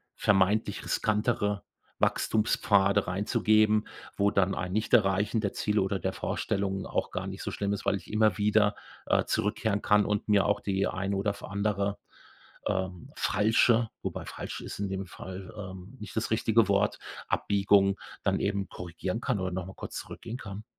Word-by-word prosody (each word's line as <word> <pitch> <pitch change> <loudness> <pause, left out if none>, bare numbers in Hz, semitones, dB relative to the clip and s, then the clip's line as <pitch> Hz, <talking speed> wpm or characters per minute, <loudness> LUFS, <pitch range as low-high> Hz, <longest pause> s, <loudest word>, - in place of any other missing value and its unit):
vermeintlich 100 +1 +2
riskantere 105 -2 0 0.4
Wachstumspfade 100 -2 +2
reinzugeben, 105 +2 +2 0.3
wo 100 0 +4
dann 95 0 +2
ein 90 0 -3
Nicht-Erreichen 105 -1 +2
der 100 - -1
Ziele 105 -1 +1
oder 95 +1 0
der - - -1
Vorstellung 95 -1 -2
auch - - -1
gar - - -3
nicht - - -6
so - - -3
schlimm 100 0 -2
ist, 100 - -5
weil 100 - +3
ich 100 - -8
immer 110 0 +3
wieder, 105 0 +3 0.3
äh, - - +3
zurückkehren 105 0 0
kann 105 0 +4
und 105 0 -1
mir 105 -2 +4
auch 105 - +2
die 95 0 0
eine 95 +2 -2
oder 100 +1 0
f - - -10
andere, 100 0 -1 0.7
ähm, 95 -2 -2
falsche“ 115 +2 +3
wobei - - -4
„falsch“ - - -6
ist - - -7
in 100 -1 -1
dem 95 0 -3
Fall, 95 +3 -9
ähm, 95 +3 -8
nicht 105 - -8
das 110 - 0
richtige 110 0 +3
Wort, 100 0 +2 0.3
Abbiegung 100 -1 +3 0.3
dann - - +1
eben 100 -1 -1
korrigieren 90 +5 -4
kann 100 - 0
oder 90 -1 -2
noch 90 -1 -3
mal 95 - -9
kurz - - -8
zurückgehen 115 +2 -7
kann. 105 -1 -8
100 Hz, 165 wpm, -29 LUFS, 95-105 Hz, 0.7 s, wo